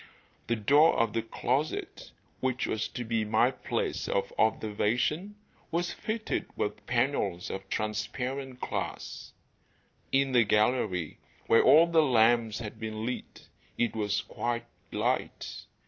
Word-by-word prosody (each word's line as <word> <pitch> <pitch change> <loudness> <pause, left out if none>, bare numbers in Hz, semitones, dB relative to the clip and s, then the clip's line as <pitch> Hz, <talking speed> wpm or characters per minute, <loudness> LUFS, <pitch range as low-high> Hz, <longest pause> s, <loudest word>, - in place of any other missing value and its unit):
The 120 - +1
door 145 +9 +5
of 115 -2 +1
the 115 - +1
closet, 130 +6 -2 0.3
which 130 -1 0
was 110 0 -1
to 125 - -5
be 115 -1 0
my 110 +4 +3
place 130 - -3
of 100 - -1
observation, 115 - +1 0.3
was 175 +1 -1
fitted 220 0 -3
with 105 0 -3
panels 120 -8 0
of 95 0 -6
transparent 125 +5 -3
glass. - - -4 0.8
In 135 0 +3
the 120 -2 +5
gallery, 105 - +1 0.3
where 115 - +5
all 160 +2 +7
the 170 -1 +4
lamps 115 -4 +3
had 110 -1 -7
been 110 0 -4
lit, 125 +1 -6 0.3
it 120 -1 0
was 105 -2 0
quite 120 0 -3 0.3
light. - - -2
120 Hz, 130 wpm, -29 LUFS, 110-130 Hz, 0.8 s, all